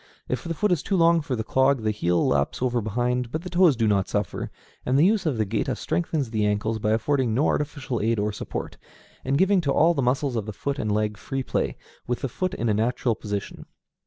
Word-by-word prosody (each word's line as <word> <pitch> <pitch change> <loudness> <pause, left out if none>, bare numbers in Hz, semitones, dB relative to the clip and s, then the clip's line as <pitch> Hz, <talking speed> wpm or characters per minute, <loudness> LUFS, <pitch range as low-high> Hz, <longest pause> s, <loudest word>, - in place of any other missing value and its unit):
If 125 -1 -2
the 165 -1 -3
foot 210 +5 +1
is 170 -5 +2
too 195 - -1
long 170 -1 +4
for 145 -4 -3
the 110 - -3
clog 130 +1 +2
the 110 - +1
heel 90 -5 +1
laps 70 0 +1
over 120 -2 +1
behind, 120 +3 -1
but 155 +3 -3
the 180 - -7
toes 175 -5 +5
do 115 -2 +1
not 100 -2 +1
suffer, 105 -3 -2 0.3
and 130 +2 +1
the 150 - +5
use 205 -3 +2
of 140 -6 0
the 110 - +1
géta 115 +5 -1
strengthens 155 -8 -1
the 110 -2 0
ankles 105 +2 0
by 105 - 0
affording 120 0 +1
no 140 +5 +2
artificial 140 -5 -1
aid 115 +2 +1
or 105 +1 0
support, - - -5 0.5
and 140 - +1
giving 190 +2 +4
to 140 -4 0
all 165 +4 +4
the 140 - -1
muscles 130 +1 0
of 110 -2 -2
foot 140 0 -3
and 105 - -1
leg 105 0 0
free 135 +4 -4
play, - - -2 0.3
with 125 -1 -2
the 135 - -2
foot 185 +9 -2
in 115 - -2
a 110 - +3
natural 120 +3 +1
position. 105 -2 -5
125 Hz, 235 wpm, -25 LUFS, 110-150 Hz, 0.5 s, toes